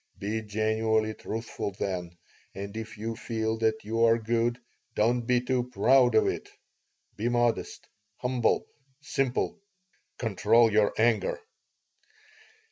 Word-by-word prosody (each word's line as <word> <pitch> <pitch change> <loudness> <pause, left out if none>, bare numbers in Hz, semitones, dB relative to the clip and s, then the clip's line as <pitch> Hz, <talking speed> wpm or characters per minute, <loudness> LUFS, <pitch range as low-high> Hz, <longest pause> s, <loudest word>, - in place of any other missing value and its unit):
Be 110 +3 -2
genuinely 110 +1 0
truthful, 110 -2 -5
then. 90 -4 -4 0.4
And 100 +2 -6
if 110 0 -6
you 115 +2 -4
feel 110 -1 -2
that 110 -1 +1
you 115 +2 0
are 115 0 +5
good, 115 +1 0 0.4
don't 120 +3 +2
be 125 -1 +4
too 125 -1 0
proud 125 +2 +4
of 110 - +5
it. - - -2 0.7
Be 115 +3 0
modest, 120 -1 0 0.3
humble, 125 -1 +1 0.3
simple. 135 +4 -1 0.6
Control 115 +1 +3
your 105 -1 +3
anger." 110 -1 +2
110 Hz, 120 wpm, -28 LUFS, 110-120 Hz, 0.7 s, are